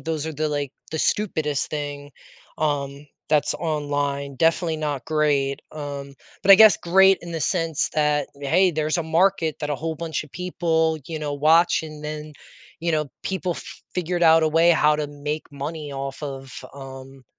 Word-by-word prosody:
those 160 Hz, -2 st, -3 dB
are 160 Hz, -, -3 dB
the, 155 Hz, +1 st, -1 dB
like, 145 Hz, -2 st, -2 dB, 0.2 s
the 160 Hz, -, -3 dB
stupidest 155 Hz, -8 st, 0 dB
thing, 145 Hz, -1 st, -5 dB, 0.5 s
um, 145 Hz, -1 st, -2 dB, 0.2 s
that's 150 Hz, -2 st, +2 dB
online. 145 Hz, -3 st, -2 dB
Definitely 165 Hz, +1 st, +1 dB
not 145 Hz, -5 st, -3 dB
great. 145 Hz, -3 st, +1 dB
Um, 140 Hz, -2 st, -7 dB, 0.3 s
but 195 Hz, -, +2 dB
I -, -, +13 dB
guess 215 Hz, +1 st, +7 dB
great 190 Hz, +2 st, +5 dB
in 170 Hz, -, -9 dB
the 165 Hz, -, -3 dB
sense 165 Hz, -4 st, 0 dB
that, 150 Hz, -1 st, +1 dB
hey, 175 Hz, +7 st, +3 dB
there's 155 Hz, 0 st, 0 dB
a 170 Hz, -, -1 dB
market 165 Hz, 0 st, +2 dB
that 150 Hz, -, -3 dB
a 145 Hz, -, 0 dB
whole 160 Hz, +3 st, -4 dB
bunch 160 Hz, -2 st, -3 dB
of 150 Hz, -, -19 dB
people, 160 Hz, -2 st, 0 dB
you 160 Hz, -2 st, -4 dB
know, 150 Hz, -1 st, -3 dB
watch 160 Hz, +5 st, +4 dB
and 155 Hz, -1 st, -9 dB
then, 150 Hz, 0 st, -6 dB, 0.5 s
you 170 Hz, +1 st, 0 dB
know, 150 Hz, -3 st, -1 dB
people 185 Hz, -2 st, -2 dB, 0.4 s
figured 180 Hz, 0 st, -1 dB
out 160 Hz, -1 st, +6 dB
a 155 Hz, -, +3 dB
way 165 Hz, +2 st, +4 dB
how 150 Hz, -2 st, +4 dB
to 150 Hz, -1 st, -2 dB
make 145 Hz, +1 st, -5 dB
money 145 Hz, +1 st, -5 dB
off 135 Hz, +1 st, -5 dB
of, 135 Hz, -2 st, -6 dB, 0.2 s
um, 135 Hz, -1 st, -11 dB
155 Hz, 175 wpm, -23 LUFS, 145-165 Hz, 0.5 s, I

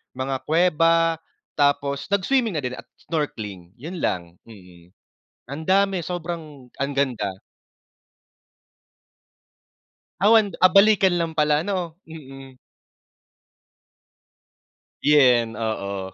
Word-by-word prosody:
mga 130 Hz, +1 st, -3 dB
kuweba, 165 Hz, 0 st, +2 dB, 0.3 s
tapos 140 Hz, -1 st, 0 dB
nag-swimming 215 Hz, +1 st, +1 dB
na 145 Hz, -, -3 dB
din 125 Hz, 0 st, -3 dB
at -, -, -12 dB, 0.2 s
snorkeling 105 Hz, -, -4 dB
yun 170 Hz, +5 st, -7 dB
lang, 85 Hz, -2 st, -2 dB, 0.2 s
mm. 90 Hz, -4 st, -16 dB, 0.6 s
Andami 190 Hz, +6 st, +1 dB
sobrang, 160 Hz, -7 st, -7 dB
ang 140 Hz, +1 st, -2 dB
ganda. 125 Hz, -7 st, -1 dB, 2.9 s
Ah, 205 Hz, -, +5 dB
wan 215 Hz, -3 st, +4 dB
ah, 185 Hz, -, +7 dB
balikan 195 Hz, -1 st, +5 dB
lang 165 Hz, -1 st, -1 dB
pala 150 Hz, 0 st, +1 dB
ano 180 Hz, -5 st, -3 dB
mm. 135 Hz, -4 st, -12 dB, 2.5 s
Yun 125 Hz, -6 st, +4 dB
oo. 100 Hz, -4 st, -4 dB
150 Hz, 95 wpm, -23 LUFS, 125-175 Hz, 2.9 s, ah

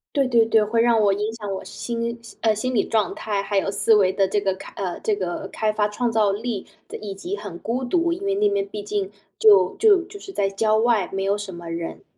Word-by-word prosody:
对 275 Hz, -2 st, +2 dB
对 230 Hz, -3 st, +4 dB
对， 220 Hz, -1 st, +4 dB
会 230 Hz, +2 st, +1 dB
让 230 Hz, -1 st, +4 dB
我 200 Hz, -1 st, +4 dB
影 210 Hz, +3 st, -2 dB
响 210 Hz, -3 st, -5 dB
我 190 Hz, -, -5 dB
心 235 Hz, 0 st, -4 dB, 0.2 s
呃， 220 Hz, -1 st, +3 dB
心 255 Hz, +5 st, -2 dB
理 220 Hz, -, +2 dB
状 215 Hz, -5 st, +1 dB
态， 205 Hz, -2 st, -2 dB
还 200 Hz, 0 st, 0 dB
有 195 Hz, -, 0 dB
思 205 Hz, +2 st, +3 dB
维 190 Hz, -2 st, +3 dB
的 195 Hz, -1 st, +1 dB
这 205 Hz, +2 st, +1 dB
个 195 Hz, -2 st, 0 dB
开 -, -, -11 dB
呃， 185 Hz, -3 st, -4 dB
这 215 Hz, -, 0 dB
个 185 Hz, 0 st, -4 dB
开 215 Hz, -1 st, -1 dB
发 210 Hz, -1 st, +1 dB
创 235 Hz, +3 st, -1 dB
造 215 Hz, -2 st, +3 dB
力， 215 Hz, 0 st, -3 dB, 0.4 s
以 205 Hz, -2 st, -5 dB
及 365 Hz, -, -4 dB
很 180 Hz, -, -8 dB
孤 245 Hz, +3 st, -3 dB
独， 340 Hz, +5 st, +1 dB
因 360 Hz, +3 st, -4 dB
为 395 Hz, 0 st, 0 dB
那 415 Hz, 0 st, +3 dB
边 405 Hz, -1 st, 0 dB
毕 365 Hz, -, -6 dB
竟 205 Hz, -2 st, -2 dB, 0.3 s
就 195 Hz, -4 st, +6 dB
就 410 Hz, -4 st, +5 dB
就 405 Hz, +3 st, -11 dB
是 -, -, -9 dB
在 200 Hz, -, 0 dB
郊 215 Hz, +2 st, +1 dB
外， 220 Hz, -4 st, +2 dB
没 195 Hz, 0 st, -2 dB
有 200 Hz, +1 st, +1 dB
什 205 Hz, -2 st, -6 dB
么 170 Hz, -1 st, -9 dB
人。 165 Hz, 0 st, -5 dB
215 Hz, 265 characters per minute, -23 LUFS, 195-235 Hz, 0.4 s, 就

